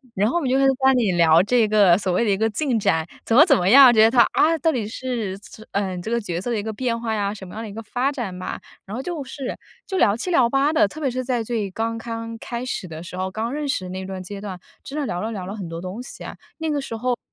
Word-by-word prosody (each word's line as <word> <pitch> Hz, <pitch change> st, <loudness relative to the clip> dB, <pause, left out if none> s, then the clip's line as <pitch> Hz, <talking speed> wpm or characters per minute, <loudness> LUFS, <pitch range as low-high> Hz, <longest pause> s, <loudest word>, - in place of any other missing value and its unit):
然 205 Hz, +3 st, +2 dB
后 -, -, -3 dB
我 -, -, 0 dB
们 275 Hz, -, -1 dB
就 265 Hz, -, +3 dB
开 -, -, +2 dB
始 270 Hz, -, +5 dB
在 270 Hz, -, +2 dB
班 265 Hz, 0 st, +4 dB
里 225 Hz, -6 st, +2 dB
聊 165 Hz, -1 st, +5 dB
这 225 Hz, +3 st, +2 dB
个 205 Hz, -5 st, +5 dB
所 190 Hz, -2 st, -1 dB
谓 205 Hz, -, +2 dB
的 215 Hz, -, 0 dB
一 195 Hz, -, +2 dB
个 220 Hz, -, +2 dB
进 255 Hz, -2 st, 0 dB
展， 160 Hz, -5 st, +1 dB, 0.2 s
怎 230 Hz, -, +1 dB
么 300 Hz, -, +9 dB
怎 275 Hz, -8 st, +4 dB
么 180 Hz, -, 0 dB
样？ 265 Hz, +2 st, +9 dB
觉 220 Hz, -2 st, +5 dB
得 225 Hz, -, +5 dB
他， 240 Hz, -1 st, +6 dB
啊， 325 Hz, +2 st, +4 dB
到 325 Hz, +3 st, +2 dB
底 230 Hz, -7 st, -2 dB
是 225 Hz, -5 st, -4 dB
这 215 Hz, +1 st, -14 dB
呃， 195 Hz, -2 st, -1 dB
这 200 Hz, +6 st, -5 dB
个 235 Hz, 0 st, +1 dB
角 175 Hz, -4 st, -3 dB
色 240 Hz, +6 st, -3 dB
的 225 Hz, -, 0 dB
一 -, -, -2 dB
个 220 Hz, +1 st, -4 dB
变 230 Hz, +1 st, -2 dB
化 225 Hz, -2 st, -1 dB
呀， 200 Hz, -1 st, -1 dB
什 200 Hz, -3 st, -10 dB
么 180 Hz, -, -11 dB
样 225 Hz, -, -5 dB
的 225 Hz, -, -6 dB
一 200 Hz, -, -9 dB
个 225 Hz, -, -6 dB
发 250 Hz, +5 st, -1 dB
展 230 Hz, -10 st, -5 dB
吧。 185 Hz, -, -5 dB, 0.3 s
然 205 Hz, -, -7 dB
后 255 Hz, -, -3 dB
就 330 Hz, -2 st, -4 dB
是 265 Hz, 0 st, -6 dB, 0.3 s
就 380 Hz, -, -2 dB
聊 205 Hz, -, +4 dB
七 250 Hz, +11 st, -4 dB
聊 260 Hz, -9 st, +4 dB
八 275 Hz, +4 st, +2 dB
的， 320 Hz, 0 st, +4 dB
特 310 Hz, -, -10 dB
别 275 Hz, -, +1 dB
是 255 Hz, +1 st, -3 dB
在 245 Hz, -3 st, 0 dB
最 215 Hz, -4 st, -3 dB
刚刚 230 Hz, +1 st, -4 dB
开 235 Hz, +2 st, -5 dB
始 235 Hz, -6 st, -4 dB
的 160 Hz, -1 st, -8 dB
时 180 Hz, +1 st, -8 dB
候， 185 Hz, 0 st, -2 dB
刚 225 Hz, +5 st, -3 dB
认 295 Hz, 0 st, -3 dB
识 185 Hz, -10 st, -2 dB
那 185 Hz, +1 st, -5 dB
段 190 Hz, -1 st, -6 dB
阶 195 Hz, +2 st, -7 dB
段 195 Hz, -3 st, -7 dB, 0.2 s
真 290 Hz, +3 st, -5 dB
的 290 Hz, -, -1 dB
聊 175 Hz, -, -3 dB
了 220 Hz, -, -3 dB
聊 185 Hz, -4 st, -5 dB
了 200 Hz, -, -5 dB
很 195 Hz, -5 st, -6 dB
多 165 Hz, 0 st, -6 dB
东 185 Hz, +6 st, -6 dB
西 -, -, -10 dB
啊。 -, -, -7 dB, 0.2 s
那 320 Hz, -1 st, -2 dB
个 295 Hz, -1 st, 0 dB
时 230 Hz, -4 st, -5 dB
候， 245 Hz, +2 st, -1 dB
225 Hz, 335 characters per minute, -22 LUFS, 195-255 Hz, 0.3 s, 么